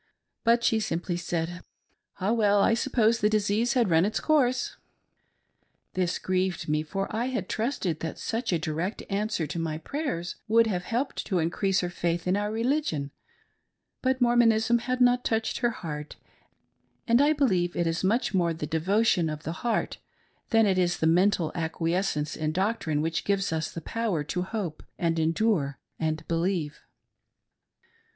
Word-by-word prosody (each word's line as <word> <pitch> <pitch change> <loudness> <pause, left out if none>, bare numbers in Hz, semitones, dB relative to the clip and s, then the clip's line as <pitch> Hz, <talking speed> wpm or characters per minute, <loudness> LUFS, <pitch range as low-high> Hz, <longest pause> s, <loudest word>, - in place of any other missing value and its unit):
But 235 0 +3
she 225 - +3
simply 175 -3 -2
said: 175 0 -3 0.3
" - - -35
Ah, 195 +3 +1
well! 205 -3 +3
I 210 - +4
suppose 230 -2 +2
the 210 - +3
disease 215 +3 +1
had 235 -8 +2
run 165 +1 +5
its 210 +3 0
course." 255 -5 +1 1.2
This 180 -1 0
grieved 185 -1 -1
me, 150 0 +1
for 195 +5 -3
I 230 +2 0
had 260 0 -2
trusted 215 - -2
that 160 - -5
such 230 0 -2
a 175 - +2
direct 160 +6 -3
answer 205 -4 0
to 160 +3 -4
my 160 -2 -2
prayers 175 - -4
would 230 +1 +5
have 180 -5 -2
helped 245 +7 -2
to 190 - 0
increase 185 +4 +1
her 180 - -2
faith 170 0 -1
in 180 +1 +2
our 205 +1 -1
religion, 225 - -1 0.9
but 260 0 +1
Mormonism 235 -1 +4
had 255 +1 -2
not 245 0 +4
touched 225 0 -1
her 240 - +2
heart, 150 -8 -6 0.9
and 235 +3 +5
I 290 +1 +5
believe 190 - +1
it 175 - 0
is 165 +2 -1
much 215 +4 +1
more 170 -3 +1
the 155 - -4
devotion 175 +2 +2
of 155 0 -6
the 160 - -3
heart 235 -3 -1 0.5
than 225 -1 +4
it 190 -2 +2
is 175 -1 +1
the - - 0
mental 175 0 +3
acquiescence 165 -1 -1
in 155 0 -2
doctrine 185 -6 0
which 165 +1 -1
gives 195 -3 0
us 160 0 -1
the 165 - -6
power 220 -9 -1
to 180 +4 -3
hope, 185 -4 -4 0.2
and 165 -1 0
endure 160 - +1 0.2
and 155 -1 -2
believe. 165 -2 -1
190 Hz, 165 wpm, -27 LUFS, 165-230 Hz, 1.2 s, run